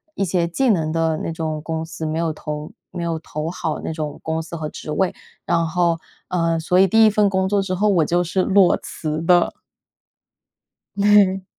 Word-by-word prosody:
一 195 - 0
些 175 -1 0
技 250 +9 0
能 160 -5 0
的 165 -1 0
那 165 - -4
种 160 -1 -3
公 160 +1 -3
司， 160 0 -8
没 155 +1 -2
有 165 -1 0
投 150 +2 -6 0.2
没 175 -2 -5
有 165 -1 -2
投 155 +1 -5
好 160 -4 -3
那 - - -3
种 155 -2 -5
公 160 0 -2
司 165 +1 -8
和 155 -2 -4
职 - - -9
位。 185 +4 0 0.3
然 165 -1 +1
后， 170 0 +1 0.3
呃， 165 -2 +1
所 180 +3 +2
以 195 - +6
第 225 +4 +5
1 215 - +5
份 205 -1 +3
工 190 0 0
作 200 +1 +1
之 190 -1 -2
后 210 +3 +1
我 175 -6 +3
就 175 +3 +1
是 180 +2 0
裸 190 0 +4
辞 155 0 -5
的。 175 +1 +3 1.4
对。 200 -2 +4
170 Hz, 210 characters per minute, -21 LUFS, 160-190 Hz, 1.4 s, 以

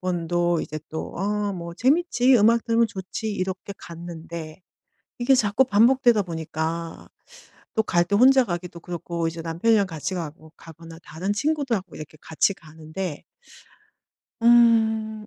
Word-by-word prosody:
번도 175 -1 0
이제 155 - -5
또 160 - -6
'어 205 +2 -1
뭐 170 -2 -7
재밌지 265 - +3
음악 230 +1 +4
들으면 230 0 +2
좋지.' 205 +2 -5
이렇게 190 0 -4
갔는데 170 -1 -9 0.6
이게 245 +2 +3
자꾸 220 +1 +3
반복되다 235 0 +4
보니까 165 -1 -5 0.7
또 220 - +2
갈 175 -4 +2
때 200 - -2
혼자 260 +3 +6
가기도 175 -3 -6
그렇고 170 -1 -4
이제 165 0 -6
남편이랑 195 +6 +2
같이 160 +1 -5
가고 160 -2 -7
가거나 165 0 -13
다른 160 +7 -3
친구들하고 260 -5 -2
이렇게 155 0 -10
같이 160 +5 +1
가는데 160 +1 -7 1.2
음 220 -2 +4
185 Hz, 290 characters per minute, -24 LUFS, 165-225 Hz, 1.2 s, 혼자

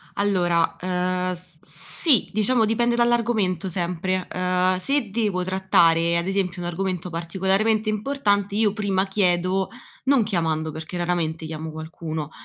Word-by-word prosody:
Allora, 175 -4 +1
ehm, 180 0 -1
s 175 -2 -8
sì, 285 - +2
diciamo 220 +2 +2
dipende 235 +2 +1
dall’argomento 230 -7 +1
sempre, 180 +1 -2
ehm, 180 0 +1
se 275 -1 0
devo 205 -5 0
trattare 170 -3 +3
ad 170 +2 -2
esempio 190 -2 -1
un 175 - -3
argomento 180 0 -3
particolarmente 190 +6 0
importante, 205 -3 0
io 210 -2 +2
prima 200 -3 0
chiedo, 185 -1 +1 0.4
non 265 -4 +4
chiamando, 160 -5 -1
perché 160 +3 -7
raramente 170 -2 -1
chiamo 160 0 -6
qualcuno, 160 -1 -6
185 Hz, 130 wpm, -23 LUFS, 170-205 Hz, 0.4 s, non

